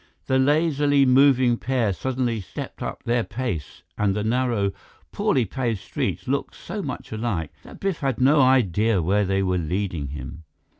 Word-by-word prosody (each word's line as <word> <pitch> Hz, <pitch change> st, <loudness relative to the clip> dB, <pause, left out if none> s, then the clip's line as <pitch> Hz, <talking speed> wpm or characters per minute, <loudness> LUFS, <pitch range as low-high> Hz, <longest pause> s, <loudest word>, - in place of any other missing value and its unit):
The 130 Hz, 0 st, +2 dB
lazily 145 Hz, -1 st, +3 dB
moving 130 Hz, -2 st, +5 dB
pair 120 Hz, -6 st, 0 dB
suddenly 125 Hz, 0 st, -2 dB
stepped 95 Hz, -, -8 dB
up -, -, -5 dB
their 120 Hz, 0 st, +1 dB
pace 110 Hz, -, -5 dB, 0.2 s
and 100 Hz, -2 st, +2 dB
the 105 Hz, -, -1 dB
narrow, 115 Hz, -3 st, +1 dB, 0.4 s
poorly 125 Hz, -4 st, +1 dB
paved 115 Hz, +1 st, -2 dB
streets -, -, -4 dB
looked -, -, -2 dB
so -, -, -6 dB
much -, -, -6 dB
alike 110 Hz, -8 st, -3 dB
that -, -, -13 dB
Biff 195 Hz, -3 st, -1 dB
had 135 Hz, -4 st, -1 dB
no 140 Hz, +3 st, +5 dB
idea 115 Hz, -5 st, +3 dB
where 100 Hz, +5 st, +2 dB
they 95 Hz, +1 st, +1 dB
were 90 Hz, -1 st, +1 dB
leading 85 Hz, -2 st, -2 dB
him. 75 Hz, +4 st, -8 dB
115 Hz, 160 wpm, -24 LUFS, 95-130 Hz, 0.4 s, moving